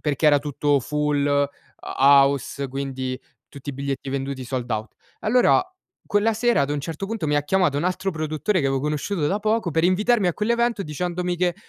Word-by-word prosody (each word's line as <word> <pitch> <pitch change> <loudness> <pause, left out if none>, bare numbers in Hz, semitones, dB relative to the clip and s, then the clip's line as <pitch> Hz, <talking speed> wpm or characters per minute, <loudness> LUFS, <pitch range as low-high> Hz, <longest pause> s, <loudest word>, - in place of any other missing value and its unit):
perché 150 0 0
era 145 -1 +6
tutto 145 0 0
full, 150 +1 0
ho 145 0 +2 0.3
house, 140 0 +3
quindi 130 -1 -4 0.3
tutti 140 0 -8
i - - -8
biglietti 135 0 -4
venduti, 135 -1 -3
sold 125 -1 -4
out. 110 +1 -3 0.3
Allora 245 +10 +4 0.5
quella 215 +2 +2
sera, 240 -6 +2
ad 140 +1 0
un 145 - -1
certo 165 +6 -5
punto, 220 -6 -3
mi 150 - +1
ha 145 - +2
chiamato 175 -2 +1
un 165 - -2
altro 185 +1 -1
produttore, 155 +4 -1
che 135 - 0
avevo 135 0 +1
conosciuto 150 +3 -1
da 200 +7 0
poco, 215 -4 0
per 160 +1 +1
invitarmi 210 +3 +3
a 170 - -1
quell'evento, 235 0 0
dicendomi 175 +3 -2
che 175 0 +1
150 Hz, 190 wpm, -23 LUFS, 140-190 Hz, 0.5 s, era